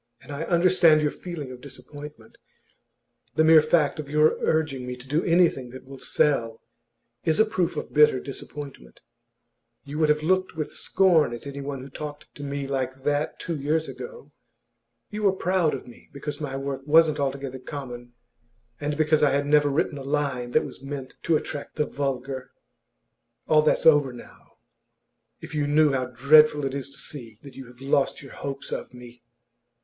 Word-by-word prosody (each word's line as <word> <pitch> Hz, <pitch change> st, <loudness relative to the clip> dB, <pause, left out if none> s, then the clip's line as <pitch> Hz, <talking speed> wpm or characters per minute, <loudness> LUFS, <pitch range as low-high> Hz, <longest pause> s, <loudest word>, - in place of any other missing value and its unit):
And -, -, -13 dB
I 145 Hz, +3 st, -4 dB
understand 170 Hz, -3 st, +4 dB
your 150 Hz, -, +1 dB
feeling 160 Hz, -7 st, -7 dB
of 125 Hz, -1 st, -10 dB
disappointment. 140 Hz, -2 st, -12 dB, 1.0 s
The 155 Hz, -, +4 dB
mere 160 Hz, 0 st, +8 dB
fact 155 Hz, -2 st, +2 dB
of 145 Hz, -2 st, -6 dB
your 150 Hz, +1 st, +4 dB
urging 150 Hz, -5 st, 0 dB
me 125 Hz, -, -4 dB
to 125 Hz, +1 st, -13 dB
do 150 Hz, +5 st, +1 dB
anything 165 Hz, -7 st, +2 dB
that 130 Hz, +2 st, -11 dB
will 135 Hz, 0 st, -11 dB
sell 120 Hz, -9 st, 0 dB, 0.6 s
is 160 Hz, -1 st, +1 dB
a 220 Hz, -, +6 dB
proof 185 Hz, -6 st, -1 dB
of -, -, -5 dB
bitter 150 Hz, -3 st, +5 dB
disappointment. 135 Hz, -, -8 dB, 0.8 s
You 145 Hz, +2 st, -6 dB
would 155 Hz, -1 st, +3 dB
have 150 Hz, 0 st, +2 dB
looked 185 Hz, +2 st, +1 dB
with 155 Hz, -2 st, -3 dB
scorn 170 Hz, -10 st, +3 dB
at 120 Hz, -, -11 dB
anyone 140 Hz, -1 st, -5 dB
who 135 Hz, -, -10 dB
talked 150 Hz, +1 st, -8 dB
to -, -, -11 dB
me 140 Hz, 0 st, -3 dB
like 130 Hz, -1 st, -3 dB
that 145 Hz, +1 st, -1 dB
two 170 Hz, -, -3 dB
years 155 Hz, +3 st, 0 dB
ago. 135 Hz, +2 st, -9 dB, 0.8 s
You 210 Hz, -, -4 dB
were 200 Hz, -2 st, +3 dB
proud 180 Hz, -5 st, +1 dB
of 130 Hz, -, -8 dB
me 120 Hz, -, -16 dB
because 145 Hz, +2 st, -6 dB
my 135 Hz, -2 st, -3 dB
work 135 Hz, 0 st, -4 dB
wasn't 155 Hz, 0 st, +5 dB
altogether 135 Hz, -1 st, -3 dB
common, 125 Hz, -3 st, -8 dB, 0.7 s
and 145 Hz, 0 st, -2 dB
because 155 Hz, -1 st, +3 dB
I 150 Hz, -, +5 dB
had 140 Hz, +1 st, +1 dB
never 145 Hz, 0 st, +4 dB
written 145 Hz, 0 st, -1 dB
a -, -, -7 dB
line 135 Hz, -3 st, -1 dB
that -, -, +3 dB
was -, -, -8 dB
meant 135 Hz, -1 st, -6 dB
to 165 Hz, -, +2 dB
attract 145 Hz, -1 st, -6 dB
the 150 Hz, -, +1 dB
vulgar. 135 Hz, -2 st, -4 dB, 1.0 s
All 155 Hz, -1 st, +5 dB
that's 150 Hz, -, +1 dB
over 145 Hz, -4 st, +6 dB
now. 120 Hz, -, -14 dB, 0.9 s
If -, -, -9 dB
you 150 Hz, -1 st, 0 dB
knew 150 Hz, 0 st, +4 dB
how 130 Hz, -2 st, -1 dB
dreadful 145 Hz, +4 st, +5 dB
it 135 Hz, -, -2 dB
is 140 Hz, 0 st, -4 dB
to 140 Hz, -, -11 dB
see 120 Hz, -7 st, -8 dB
that 140 Hz, -3 st, -12 dB
you 135 Hz, -2 st, -9 dB
have 125 Hz, +1 st, -17 dB
lost 135 Hz, 0 st, +1 dB
your 135 Hz, -, -12 dB
hopes 140 Hz, -1 st, -6 dB
of -, -, -5 dB
me! 120 Hz, -1 st, -13 dB
145 Hz, 180 wpm, -25 LUFS, 135-155 Hz, 1.0 s, mere